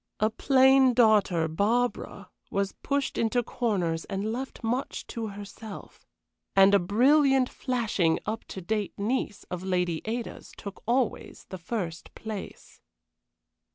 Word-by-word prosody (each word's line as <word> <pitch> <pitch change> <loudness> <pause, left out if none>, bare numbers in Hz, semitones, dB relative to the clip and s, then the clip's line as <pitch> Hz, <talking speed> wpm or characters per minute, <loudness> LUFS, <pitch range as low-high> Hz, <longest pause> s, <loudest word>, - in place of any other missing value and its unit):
A 215 +1 +2
plain 265 +1 +5
daughter, 210 -8 +4
Barbara, 225 +9 -1 0.2
was 200 -2 -1
pushed 280 -1 -1
into 235 +2 +1
corners 185 -10 -1
and 200 +2 -3
left 260 +2 -6
much 245 +4 -2
to 230 -1 -5
herself. 205 +1 -10 0.5
And 195 +1 +7
a 200 - +6
brilliant, 265 +7 +4
flashing, 225 -10 0
up 220 +2 -3
to 190 - -8
date 210 +2 -2
niece 215 0 -2
of 180 -1 -3
Lady 180 -3 -1
Ada's 230 +2 -5
took 200 -1 -8
always 245 -1 -1
the 185 - -7
first 170 -3 -5
place. 215 -3 -8
215 Hz, 125 wpm, -27 LUFS, 195-245 Hz, 0.5 s, And